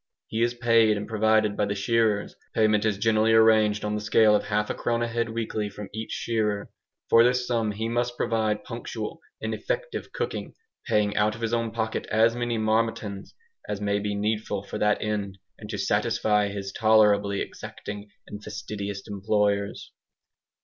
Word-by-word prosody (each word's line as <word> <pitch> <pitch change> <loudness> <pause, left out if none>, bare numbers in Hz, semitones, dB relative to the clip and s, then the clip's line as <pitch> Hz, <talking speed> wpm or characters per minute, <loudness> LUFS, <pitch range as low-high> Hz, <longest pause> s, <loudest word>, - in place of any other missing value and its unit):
He 110 - -3
is 120 +1 +1
paid 115 -3 +4
and 105 - -5
provided 110 -1 +2
by 105 - +1
the 100 - -2
shearers. 105 0 +1 0.2
Payment 110 -1 +3
is 105 -2 +1
generally 110 +1 +3
arranged 110 -2 +4
on 105 - -1
the 105 - -2
scale 105 0 +4
of - - 0
half 105 0 0
a - - -1
crown 120 0 -1
a - - 0
head 115 0 -1
weekly 110 -2 -3
from 100 0 -9
each 110 +1 -5
shearer. 105 -3 -1 0.4
For 115 - +6
this 125 +1 +2
sum 115 -3 0
he 110 +2 -3
must 120 +1 -1
provide 110 -2 0
punctual - - -6 0.2
and - - -3
effective - - -4
cooking, 470 -2 -4 0.3
paying 105 -1 +1
out 105 +1 +2
of 115 - -11
his 115 0 -1
own 115 -1 0
pocket 110 0 -3
as 115 +2 +3
many 120 -1 -1
"marmitons" 110 -2 -1 0.3
as 105 - -2
may 100 0 0
be 105 0 -2
needful 105 -1 -1
for 105 +1 -6
that 105 0 +2
end, 100 -3 -3 0.2
and 105 - -10
to 105 - -3
satisfy 105 +1 +1
his 100 -1 -5
tolerably 105 -2 +4
exacting 105 0 -7 0.2
and 105 0 -9
fastidious 100 -1 -5
employers. 100 0 -1
110 Hz, 175 wpm, -26 LUFS, 105-115 Hz, 0.4 s, For